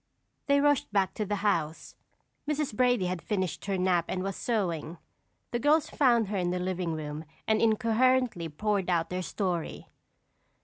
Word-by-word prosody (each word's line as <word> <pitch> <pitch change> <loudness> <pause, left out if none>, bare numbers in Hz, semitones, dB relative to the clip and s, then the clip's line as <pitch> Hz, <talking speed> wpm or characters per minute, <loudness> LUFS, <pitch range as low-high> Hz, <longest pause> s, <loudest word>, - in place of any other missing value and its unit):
They 280 0 +4
rushed 290 -5 +2
back 195 -2 +1
to 210 -2 -3
the 205 - 0
house. 165 -6 -1 0.6
Mrs. 300 -4 -1
Brady 245 -4 +3
had 180 -1 -2
finished 190 -6 -2
her 195 -1 -1
nap 180 -2 +2
and 185 0 -2
was 195 -1 -3
sewing. 175 -8 -2 0.5
The 240 - -1
girls 305 +4 +3
found 235 -7 +3
her 205 - -1
in 180 -1 0
the 180 - -1
living 180 -2 -2
room 150 0 -5 0.2
and 220 0 +2
incoherently 230 -3 +2
poured 200 +4 -1
out 170 -1 +1
their 180 0 -2
story. 180 -3 -3
195 Hz, 165 wpm, -29 LUFS, 175-235 Hz, 0.6 s, They